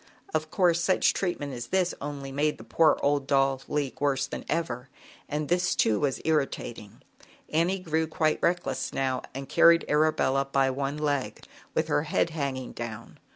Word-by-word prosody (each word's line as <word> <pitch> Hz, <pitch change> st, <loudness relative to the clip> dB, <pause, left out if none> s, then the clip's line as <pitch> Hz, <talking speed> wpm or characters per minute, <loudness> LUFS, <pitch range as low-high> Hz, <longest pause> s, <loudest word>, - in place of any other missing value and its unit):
Of 155 Hz, 0 st, -1 dB
course, 175 Hz, -2 st, +2 dB
such 185 Hz, -, +3 dB
treatment 145 Hz, -7 st, -2 dB
as 120 Hz, -1 st, -6 dB
this 185 Hz, -1 st, +1 dB
only 140 Hz, -1 st, -5 dB
made 150 Hz, +2 st, 0 dB
the -, -, -11 dB
poor 160 Hz, -1 st, +3 dB
old 140 Hz, -1 st, +1 dB
doll 135 Hz, -1 st, +2 dB
leak 145 Hz, -3 st, -2 dB
worse 135 Hz, -2 st, +1 dB
than -, -, -6 dB
ever, 130 Hz, -6 st, -2 dB, 0.4 s
and 150 Hz, 0 st, -2 dB
this, 180 Hz, +2 st, +1 dB
too, 110 Hz, -2 st, +2 dB
was 140 Hz, -3 st, 0 dB
irritating. 135 Hz, -8 st, -2 dB, 0.5 s
Annie 170 Hz, +5 st, +2 dB
grew 160 Hz, -3 st, -1 dB
quite 155 Hz, 0 st, +1 dB
reckless 175 Hz, +1 st, 0 dB
now, 130 Hz, -1 st, 0 dB
and 135 Hz, 0 st, -5 dB
carried 170 Hz, +4 st, +5 dB
Arabella 150 Hz, -3 st, +2 dB
by 135 Hz, -1 st, +2 dB
one 140 Hz, +2 st, -3 dB
leg, 145 Hz, -3 st, -2 dB, 0.3 s
with -, -, +1 dB
her -, -, +2 dB
head 165 Hz, +2 st, +1 dB
hanging 135 Hz, -5 st, -3 dB
down. 115 Hz, -1 st, -8 dB
145 Hz, 165 wpm, -27 LUFS, 135-160 Hz, 0.5 s, carried